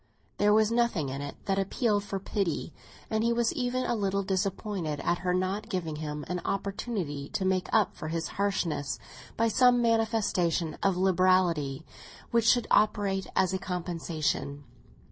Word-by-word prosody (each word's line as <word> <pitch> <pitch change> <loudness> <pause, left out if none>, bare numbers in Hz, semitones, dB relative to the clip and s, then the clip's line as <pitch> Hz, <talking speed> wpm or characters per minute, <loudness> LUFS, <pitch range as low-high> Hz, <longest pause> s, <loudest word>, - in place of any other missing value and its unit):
There 205 0 +4
was 215 +1 +4
nothing 230 - +1
in 135 +2 -4
it 145 0 -6
that 195 -1 +1
appealed 205 +1 +1
for 195 -1 -4
pity, 185 -4 -2 0.4
and 220 0 +1
he 235 - +2
was 235 0 +1
even 255 -3 -1
a - - 0
little 200 -3 0
disappointed 190 -4 -2
at 175 +3 0
her 180 0 -1
not 190 +4 -1
giving 170 -7 -3
him 150 -1 -5
an 180 -1 -3
opportunity 195 -7 -3
to 190 - -2
make 185 -1 +1
up 215 -3 +3
for 155 - -6
his 165 +1 -2
harshness 185 -8 -1 0.4
by 230 - +3
some 250 +1 +5
manifestation 220 -8 +1
of 195 -2 +2
liberality 180 -6 +2 0.5
which 235 -1 +3
should 245 0 +4
operate 200 -3 +2
as 185 0 +2
a 190 - -1
compensation. 165 -5 -3
190 Hz, 160 wpm, -29 LUFS, 170-215 Hz, 0.5 s, some